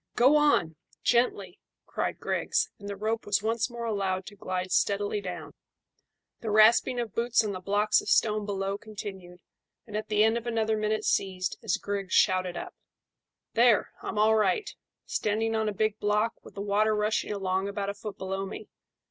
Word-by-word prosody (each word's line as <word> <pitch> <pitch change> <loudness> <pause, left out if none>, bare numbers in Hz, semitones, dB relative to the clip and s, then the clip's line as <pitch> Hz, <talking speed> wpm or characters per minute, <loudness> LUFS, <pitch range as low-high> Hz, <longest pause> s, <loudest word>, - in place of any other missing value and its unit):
"Go 260 +5 +5
on! 230 - +3 0.3
Gently!" 205 -7 +1 0.3
cried - - -3
Griggs, - - 0
and 200 0 -8
the 200 - -4
rope 220 +3 -2
was 205 0 0
once 230 +2 0
more 235 -1 -6
allowed 195 -4 -1
to 205 - -10
glide 185 -1 -4
steadily 205 +2 +1
down; 180 -2 -7 0.9
the 225 - -4
rasping 225 +4 +5
of 235 -4 -3
boots 235 0 +2
on 210 - -1
the 185 - -5
blocks 205 +3 +2
of - - -6
stone 215 -1 +3
below 195 -1 -2
continued, 190 -5 -9 0.4
and 210 - -9
at 215 0 -3
the 210 0 +3
end 225 +2 +3
of 235 - -11
another 220 -2 +1
minute 215 0 -1
ceased 185 -2 0
as 215 -5 0
Griggs 200 -2 -4
shouted 185 -2 +3
up - - -6 0.8
"There, 235 -2 +4
I'm - - -5
all 215 +1 +4
right 215 - +1 0.3
standing 225 +2 -1
on 220 -1 +1
a - - -2
big 215 +1 -1
block 210 +2 +1
with - - -14
the 200 - -5
water 210 +2 +2
rushing 210 0 0
along 190 -1 -1
about 200 0 -3
a - - -8
foot 205 0 -8
below 195 +1 -3
me. 195 - -8
210 Hz, 180 wpm, -28 LUFS, 195-220 Hz, 0.9 s, Go